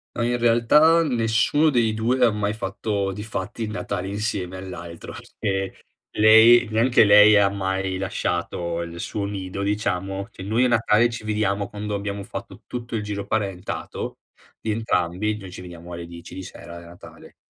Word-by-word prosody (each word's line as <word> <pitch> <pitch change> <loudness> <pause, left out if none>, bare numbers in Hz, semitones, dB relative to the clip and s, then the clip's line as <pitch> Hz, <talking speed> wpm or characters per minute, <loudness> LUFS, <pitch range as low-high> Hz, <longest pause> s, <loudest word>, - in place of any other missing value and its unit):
Ah, 120 - -1
in 120 0 0
realtà 150 +8 +4
nessuno 120 +4 +2
dei 115 -4 +2
2 125 +3 +1
ha 115 - +4
mai 105 0 -1
fatto 100 -1 -2
di 105 +2 -6
fatti 105 +1 -5
il 110 - -3
Natale 95 -3 -4
insieme 100 -3 -3
all'altro. 85 -3 -8 0.3
Perché, 95 -1 -3 0.3
lei 110 +3 +7
neanche 115 +1 +4
lei 105 +1 +7
ha 100 -1 +5
mai 95 -1 -2
lasciato 85 -2 -2
il 85 0 -6
suo 100 +2 -3
nido, 100 -1 -4
diciamo 100 -1 -2
che - - -10
noi 110 +6 +1
a - - +3
Natale 115 0 +3
ci 120 -1 -6
vediamo 105 -2 -1
quando 105 0 -5
abbiamo 100 0 -4
fatto 120 - -8
tutto 120 -2 -5
il 105 - -3
giro 100 -1 -4
parentato 100 -4 -4 0.4
di 110 - -2
entrambi. 105 -1 -1
Noi 95 -3 -10
ci - - -8
vediamo 85 -1 -10
alle 85 0 -6
10 85 0 -11
di 95 - -6
sera 85 -1 -10
a - - -10
Natale. 85 +1 -14
105 Hz, 170 wpm, -23 LUFS, 95-110 Hz, 0.4 s, lei